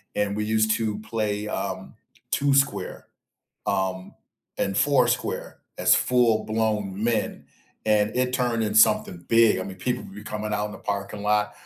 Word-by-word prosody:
and 100 -1 0
we 105 - -1
used 110 0 +2
to 110 -2 -2
play, 105 -1 -2
um, - - -4 0.4
Two 140 0 +2
Square, 140 +1 0 0.6
um, 95 -1 -2 0.4
and 95 - -1
Four 140 0 +4
Square - - -2 0.2
as - - +5
full 120 -3 +2
blown 105 -2 -1
men, 115 -1 -1 0.4
and 105 0 +2
it 125 0 +1
turned 120 -3 0
in 105 0 -2
something 105 -5 +4
big 115 -4 +5
I - - -2
mean, 95 - -8
people 125 +6 -2
would 95 - -12
be 105 +1 -10
coming 105 0 -4
out 105 0 -1
in 105 - -8
the - - -9
parking 100 0 -4
lot, 105 0 +1
105 Hz, 170 wpm, -25 LUFS, 105-115 Hz, 0.6 s, as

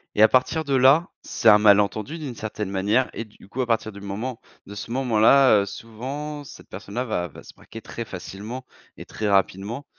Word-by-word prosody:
Et 105 - +2
à 110 - +9
partir 130 +7 +1
de 140 -1 0
là, 135 +7 +5
c'est 115 - -2
un 105 - +8
malentendu 105 +7 +3
d'une 145 -6 -6
certaine 110 -2 -5
manière 105 +6 +1
et - - -4
du 105 -3 -19
coup 125 +6 -4
à - - 0
partir 110 -1 0
du 100 - -11
moment 110 +5 -5 0.2
de 100 - -10
ce 105 - -7
moment-là, 125 -1 +4
heu, - - -2
souvent 135 +8 -7
cette 140 - -13
personne-là 100 +6 -5
va 90 -7 -2
va - - -13
se - - -14
braquer 115 - -12
très 115 - -6
facilement 105 +5 -8 0.3
et - - -9
très 105 -1 -3
rapidement 100 +6 0
110 Hz, 205 wpm, -23 LUFS, 100-130 Hz, 0.3 s, à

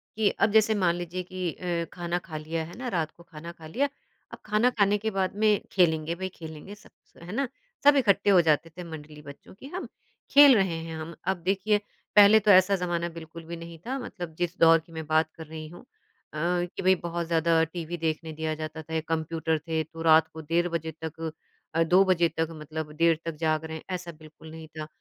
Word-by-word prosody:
कि 215 -1 +3
अब 210 - +3
जैसे 220 0 +4
मान 170 -2 +3
लीजिए 175 +1 -4
कि 185 -1 -4
अ, 170 -2 -2
खाना 175 0 -2
खा 155 -3 -5
लिया 160 +1 -3
है 170 +2 -11
ना 250 +1 -5
रात 155 -2 -1
को 170 - -15
खाना 170 0 -10
खा 160 -2 -12
लिया, 275 - 0 0.4
अब - - -9
खाना 215 +4 +3
खाने 205 0 +4
के 220 +2 -2
बाद 190 0 0
में 215 - +6 0.2
खेलेंगे 165 -3 +2
भई 185 +1 -4
खेलेंगे 160 +4 -9
सब - - -19
से, - - -22
है 180 - -8
ना? 275 -1 0 0.4
सब 285 0 +7
इकट्ठे 210 -6 +3
हो 190 -3 +7
जाते 165 0 +2
थे 180 - -6
मंडली 155 -2 -10
बच्चों 140 +3 -13
की 265 - -11
हम, 370 - -4 0.4
खेल 285 -2 +9
रहे 190 -5 +1
हैं 165 -1 -6
हम 160 +1 -7 0.2
अब 190 - -3
देखिए 205 +2 +2 0.4
पहले 210 +1 +8
तो 210 0 +4
ऐसा 190 +1 +6
ज़माना 175 -2 -1
बिल्कुल 165 +1 -9
भी 170 - -6
नहीं 170 0 -9
था 265 +2 -2
मतलब 175 -9 -7
जिस 175 +1 -2
दौर 165 0 +7
की 160 - -19
मैं 160 -1 -5
बात 155 0 +2
कर 160 - -8
रही 155 0 -7
हूँ। 175 - -12 0.5
अ, - - -6 0.3
कि 180 - -7
भई 185 +1 +5
बहुत 170 0 -3
ज़्यादा 165 0 +3
टीवी 170 +1 -5
देखने 160 0 -2
दिया 160 0 -2
जाता 155 0 -6
था 160 +1 -10
या 160 - +1
कंप्यूटर 160 0 -1
थे 160 -1 0
तो 165 +1 -11
रात 160 -1 +5
को 160 - -7
1:30 165 +3 +1
बजे 165 -1 -3
तक 160 0 -6 0.5
अ, 165 - +4
2 180 +4 +5
बजे 175 -3 +3
तक 160 0 +1
मतलब 155 -1 -6
देर 165 0 +4
तक 165 -1 -3
जाग 155 0 0
रहे 160 0 -5
हैं - - -12
ऐसा 175 -1 -6
बिल्कुल 155 0 -14
नहीं 160 0 -10
था। 155 0 -5
165 Hz, 230 wpm, -27 LUFS, 160-185 Hz, 0.5 s, खेल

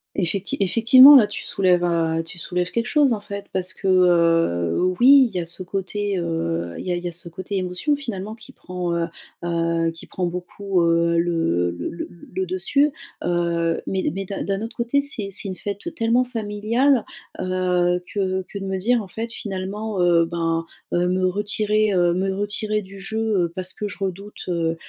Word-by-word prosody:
Effecti 195 +1 -1
effectivement, 235 +8 +8
là, 235 -6 +7
tu 205 - -7
soulèves, 180 -2 +2
heu, 165 -1 +1
tu 170 +2 -9
soulèves 180 +1 -2
quelque 235 +1 -1
chose 290 -5 +3
en 215 - -2
fait, 200 -1 -7
parce 185 -1 -2
que, 195 - -4
heu, 165 - +3 0.2
oui, 265 +1 +7
il 200 - -17
y - - +1
a 170 - -3
ce 170 +3 -6
côté, 195 +2 -2
heu, 85 - -2
il - - -7
y - - 0
a - - +1
il 175 - -5
y - - -2
a - - -3
ce 170 +1 -8
côté 185 +3 -5
émotion 185 +11 -1
finalement 215 -7 -5
qui 220 -1 -14
prend, 180 -1 -5
heu 170 0 0 0.4
heu, 165 -1 0
qui 165 - -12
prend 185 - -3
beaucoup, 180 +2 -2
heu, 170 0 +2
le 165 - +1
le 85 - -4
le 170 - -6
le 185 +2 -6
dessus, 190 +11 +2 0.3
heu, 170 -1 0
mais 190 -1 -2
mais 195 +4 -4
d'un 195 - -5
d'un 195 0 -2
autre 225 - -7
côté 240 +4 +1
c'est 270 -8 -3
c'est 200 +1 -4
une 185 - -4
fête 205 - -5
tellement 235 0 +2
familiale, 230 +3 +1 0.3
heu, 180 -1 +1
que 190 -2 -1
que - - -7
de 195 - -5
me 190 0 -2
dire, 235 +3 +2
en - - -10
fait 225 +5 -5
finalement, 200 0 -4
heu, 170 -1 +4
ben, 165 -1 -1 0.3
heu, 175 0 +1
me 185 +1 +1
retirer, 210 +2 +1
heu, 175 -1 +3
me 190 +1 0
retirer 210 +1 -1
du 195 0 -12
jeu, 220 -2 0
heu, 170 - -6
parce 185 0 -2
que 210 - -3
je 200 - -6
redoute, 195 +2 -5
heu 165 -2 0
185 Hz, 200 wpm, -22 LUFS, 175-210 Hz, 0.4 s, effectivement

